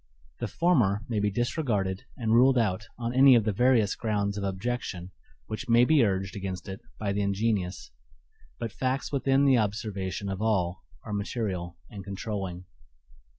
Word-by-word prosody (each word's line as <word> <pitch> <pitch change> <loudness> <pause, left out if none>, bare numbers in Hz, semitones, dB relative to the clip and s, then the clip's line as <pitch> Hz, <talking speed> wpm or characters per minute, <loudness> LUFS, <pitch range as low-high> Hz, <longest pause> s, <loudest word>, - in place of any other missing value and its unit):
The - - -2
former 115 - +2
may 110 -3 0
be 105 0 +1
disregarded 105 - -1
and 115 -3 0
ruled 130 +3 +5
out 105 -3 0
on 120 0 -3
any 130 0 +7
of 115 - +4
the 105 - +1
various 115 -1 +3
grounds 100 -2 -1
of 100 - -4
objection 95 -2 -3 0.3
which 120 - -6
may 120 +1 +6
be 150 -2 +5
urged 95 -2 -1
against 95 -2 -5
it 95 0 -7 0.2
by 100 -2 -2
the 100 - 0
ingenious; 100 - -1 0.7
but 115 - -4
facts 130 +1 -2
within 135 0 +2
the 130 -3 +5
observation 100 -2 -3
of 95 +1 -3
all 95 -5 0 0.2
are 105 - -6
material 100 -4 -3
and 100 -2 -8
controlling. 95 -2 -5
105 Hz, 160 wpm, -28 LUFS, 95-120 Hz, 0.7 s, any